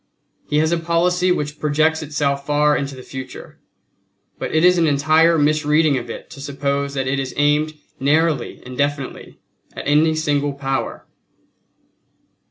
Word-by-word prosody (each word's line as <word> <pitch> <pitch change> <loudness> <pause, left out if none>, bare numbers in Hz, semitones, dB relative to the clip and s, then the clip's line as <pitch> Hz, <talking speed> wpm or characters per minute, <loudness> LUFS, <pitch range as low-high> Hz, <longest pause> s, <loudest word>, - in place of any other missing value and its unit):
He 150 - +1
has 155 +1 +2
a 170 - +1
policy 180 +2 +1
which 150 -3 -2
projects 155 +2 +1
itself 145 -2 -1
far 150 +1 +2
into 140 -1 -3
the 130 - -10
future, 130 0 -9 0.8
but - - -4
it 160 +2 +3
is 180 -1 +5
an 165 - +3
entire 155 +3 +4
misreading 150 0 +2
of 125 - -4
it - - -7
to 140 - -10
suppose 140 0 -2
that 135 -1 -1
it 135 +1 -1
is 135 -1 -4
aimed 150 +1 +2 0.2
narrowly 150 -1 +1
and 125 0 -8
definitely 145 -1 -3 0.4
at - - -7
any 155 +2 +3
single 145 -2 0
Power." 135 -1 -3
145 Hz, 155 wpm, -20 LUFS, 140-155 Hz, 0.8 s, is